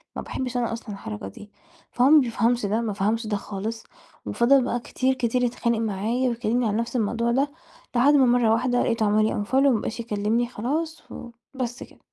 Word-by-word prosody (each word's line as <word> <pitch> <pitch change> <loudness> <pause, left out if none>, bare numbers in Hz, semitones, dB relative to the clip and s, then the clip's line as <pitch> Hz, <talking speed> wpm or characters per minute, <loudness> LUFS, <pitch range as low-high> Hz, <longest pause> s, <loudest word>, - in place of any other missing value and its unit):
ما - - -4
باحبش 255 -1 -4
أنا 235 -2 -1
أصلًا 230 0 -8
الحركة 105 - -6
دي. 205 - -12 0.4
فهو 250 +3 +3
ما 310 - +8
بيفهمش 235 -2 +1
ده، 215 +3 0
ما 215 -3 -2
فهمش 215 +3 -1
ده 205 -1 -1
خالص، 210 +3 -5 0.4
وفضل 260 +3 +3
بقى 245 0 -1
كتير، 260 +2 -1
كتير 250 -1 0
يتخانق 235 -1 0
معايا، 225 +4 -1
ويكلمني 235 0 0
عن 210 - -1
نَفس 235 +3 -2
الموضوع 235 +1 0
ده، 275 +4 +1 0.4
لحد 265 +5 +5
ما 275 -3 +5
مرة 240 -2 +3
واحدة 245 +2 +1
لقيته 230 -2 0
عمل 215 +1 +3
لي 205 -1 -1
unfollow، 235 - -16
وما 245 -5 +3
بقاش 230 - -5
يكلمني 225 +1 0
خلاص، 300 +8 -3 0.5
وبس 245 0 -4
كده، - - -17
235 Hz, 195 wpm, -24 LUFS, 215-250 Hz, 0.5 s, ما